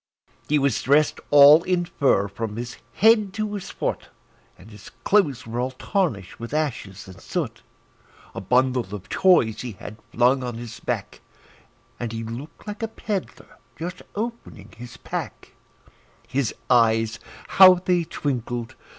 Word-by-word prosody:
He 150 - +3
was 140 -5 +1
dressed 145 +3 +2
all 145 +2 +8
in 180 0 0
fur 135 - +1
from 105 +1 -5
his 120 0 -6 0.2
head 215 -3 +4
to 215 -1 -2
his 200 -3 -6
foot, - - -4 0.5
And 105 +5 -15
his 105 -2 -13
clothes 155 - +2
were 115 +2 -4
all 125 +1 0
tarnished 130 - -2
with 115 +5 -5
ashes 115 -12 -3
and 95 - -13
soot; - - -4 0.7
A - - -6
bundle 125 0 +1
of 105 +2 -11
toys 165 - +3
he 120 -3 -6
had 105 +3 -10
flung 125 +3 +3
on 125 -2 -4
his 115 0 -8
back, - - -4 0.8
And 120 -2 -4
he 115 0 -5
looked 120 +7 -9
like 210 +1 -7
a 225 - -1
peddler 210 -3 -6 0.2
just 180 +2 -6
opening 210 - -6
his 120 +1 -11
pack; - - -6 0.8
His 130 -4 -1 0.2
eyes 115 -2 +3 0.3
how 185 -1 +8
they 180 -1 0
twinkled! 120 -6 -4
130 Hz, 150 wpm, -23 LUFS, 115-175 Hz, 0.8 s, all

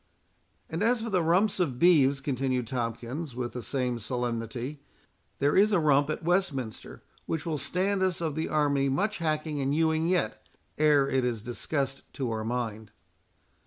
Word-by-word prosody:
"And 160 - -4
as 230 +1 +2
for 230 - -4
the 185 -2 +3
rumps 185 +6 +2
of 140 -9 0
beeves," 140 -4 +4
continued 130 -2 -1
Tomkins, 120 +4 -4
with 125 -1 -3
the 125 - -4
same 125 -2 -1
solemnity, 120 +4 -3 0.6
"there 145 +1 +2
is 210 +2 +5
a 200 - +4
rump 145 -2 +3
at 155 - -3
Westminster, 160 - -1 0.2
which 160 0 -2
will 155 -3 -2
stand 190 +4 0
us 185 -2 +1
of 160 -3 -1
the 160 +2 -2
army 140 -3 +2
much 200 +10 0
hacking 155 -2 -1
and 140 +1 0
hewing 160 0 +2
yet, 175 -11 0 0.4
ere 150 -3 +4
it 135 -2 +1
is 120 -4 -2
discussed 135 +3 -2
to 130 -4 -2
our 110 -1 -2
mind." 110 -2 -3
140 Hz, 165 wpm, -28 LUFS, 125-165 Hz, 0.6 s, is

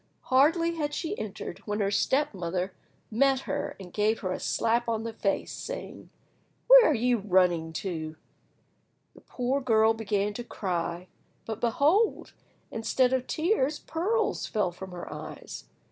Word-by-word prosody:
Hardly 330 +5 +4
had 295 -2 -2
she 335 +4 -3
entered - - -6
when 210 0 -1
her 200 -1 +1
step 270 +7 +1
mother 180 0 -3 0.4
met 265 +3 +3
her 285 +1 -3
and 180 -2 -10
gave 215 +1 +1
her 185 - -2
a - - -3
slap 235 +1 +1
on 225 -1 -1
the 230 0 -4
face, 195 -2 -1
saying— - - -7 0.6
"Where - - +9
are - - +4
you 245 0 +2
running 180 -4 +2
to?" 160 -3 -4 1.0
The - - -17
poor 260 +3 -2
girl 225 -3 +4
began 210 -2 -1
to 240 - -5
cry, 175 -5 -3 0.4
but 220 -1 -5
behold! 295 - +2 0.4
instead 250 +3 +1
of 260 -1 0
tears 310 -4 +1
pearls 385 +11 -1
fell 205 -5 0
from 190 +2 -9
her 175 -1 -7
eyes. - - -8
225 Hz, 150 wpm, -28 LUFS, 195-280 Hz, 1.0 s, Where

